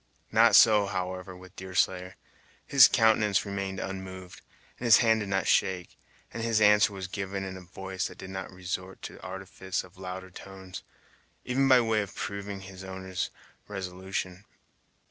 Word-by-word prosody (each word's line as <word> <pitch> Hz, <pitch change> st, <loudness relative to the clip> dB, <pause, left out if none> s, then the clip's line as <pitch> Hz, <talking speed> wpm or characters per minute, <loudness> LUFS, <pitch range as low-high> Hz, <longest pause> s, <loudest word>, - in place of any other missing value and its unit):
Not -, -, +6 dB
so, 105 Hz, -2 st, +7 dB
however, 95 Hz, -1 st, -4 dB
with 95 Hz, 0 st, -15 dB
Deerslayer. 95 Hz, 0 st, -1 dB, 0.5 s
His 135 Hz, -2 st, +8 dB
countenance 110 Hz, -3 st, +3 dB
remained 100 Hz, -1 st, -4 dB
unmoved; 95 Hz, -1 st, -7 dB, 0.4 s
his 120 Hz, -3 st, +6 dB
hand 110 Hz, -2 st, +3 dB
did 105 Hz, -2 st, -4 dB
not 95 Hz, 0 st, 0 dB
shake, 95 Hz, -3 st, +1 dB, 0.4 s
and 115 Hz, -, -4 dB
his 115 Hz, -1 st, +1 dB
answer 105 Hz, -1 st, +5 dB
was 95 Hz, -2 st, -6 dB
given 95 Hz, +1 st, -4 dB
in 95 Hz, -1 st, -5 dB
a 95 Hz, -, -9 dB
voice 95 Hz, +1 st, -5 dB
that -, -, -12 dB
did 95 Hz, -, -9 dB
not 95 Hz, 0 st, -5 dB
resort 90 Hz, +1 st, -6 dB
to -, -, -6 dB
the -, -, -14 dB
artifice 95 Hz, 0 st, -5 dB
of 90 Hz, 0 st, -17 dB
louder 95 Hz, 0 st, -7 dB
tones, 95 Hz, 0 st, -10 dB, 0.6 s
even 135 Hz, +2 st, +2 dB
by 130 Hz, -2 st, +7 dB
way 110 Hz, -2 st, +1 dB
of 100 Hz, -, -7 dB
proving 100 Hz, -1 st, -5 dB
its 95 Hz, -1 st, -10 dB
owner's 95 Hz, -1 st, -4 dB, 0.4 s
resolution. 95 Hz, -1 st, -5 dB
95 Hz, 160 wpm, -28 LUFS, 95-100 Hz, 0.6 s, His